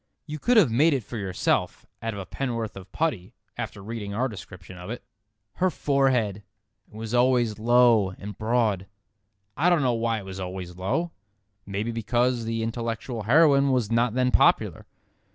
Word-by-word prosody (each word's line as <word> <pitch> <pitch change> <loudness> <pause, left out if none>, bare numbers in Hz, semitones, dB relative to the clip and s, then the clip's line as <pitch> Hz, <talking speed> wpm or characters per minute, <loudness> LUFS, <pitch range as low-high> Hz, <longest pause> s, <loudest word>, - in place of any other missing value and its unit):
You 155 -1 -6
could 245 - +3
have 170 - +5
made 145 +6 +4
it 130 - -2
for 115 - -7
yourself 95 -3 -1 0.2
out 115 -1 -3
of - - -6
a 95 - -6
pen'orth 115 -4 -3
of 95 0 -11
putty 140 - -2 0.2
after 100 - -6
reading 105 -2 -5
our 125 +4 +1
description 95 -4 -10
of 90 +2 -9
it. 120 - -6 0.5
"Her 185 +1 +2
forehead!" 130 - +1 0.5
It - - -19
was 110 +1 -6
always 120 -3 +2
"low 120 -3 +4
and 105 +1 -8
broad." 110 -4 0 0.7
I 165 +6 +3
don't 170 -5 +3
know 125 -2 +2
why 115 0 0
it 100 - -7
was 95 0 -7
always 90 -1 -6
low. 130 - -1 0.6
Maybe 105 +4 -2
because 120 +1 0
the 115 0 -2
intellectual 115 +1 -4
heroine 140 +3 +4
was 125 -5 0
not 115 0 +2
then 125 0 +2
popular. - - +2
115 Hz, 170 wpm, -25 LUFS, 100-130 Hz, 0.7 s, have